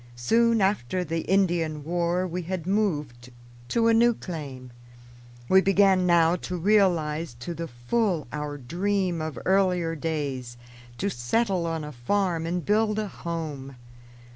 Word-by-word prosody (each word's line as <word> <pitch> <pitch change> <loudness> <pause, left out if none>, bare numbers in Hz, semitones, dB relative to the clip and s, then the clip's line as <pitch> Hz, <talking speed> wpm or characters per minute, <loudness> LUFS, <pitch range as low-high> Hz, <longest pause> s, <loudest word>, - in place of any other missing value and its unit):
Soon 230 - +2
after 185 - 0
the 165 0 -2
Indian 170 -6 +1
War 175 +3 0
we 180 0 -3
had 175 -1 -4
moved 150 - -1 0.4
to 230 - +2
a 230 - +5
new 235 +1 +4
claim. 140 - -7 0.8
We 190 0 +6
began 195 -1 +4
now 170 -1 +4
to 180 +1 -5
realize 170 - +2
to 125 +8 -6
the 165 0 -5
full 165 - -1
our 150 -1 -4
dream 180 +5 -1
of 155 -5 -4
earlier 180 -3 +2
days, 140 -6 -3 0.4
to 200 +1 -1
settle 180 - 0
on 165 -1 -3
a 150 - -6
farm 165 +5 -1
and 175 0 -2
build 215 0 +2
a 215 -2 -2
home. 155 -7 -6
170 Hz, 140 wpm, -26 LUFS, 150-195 Hz, 0.8 s, We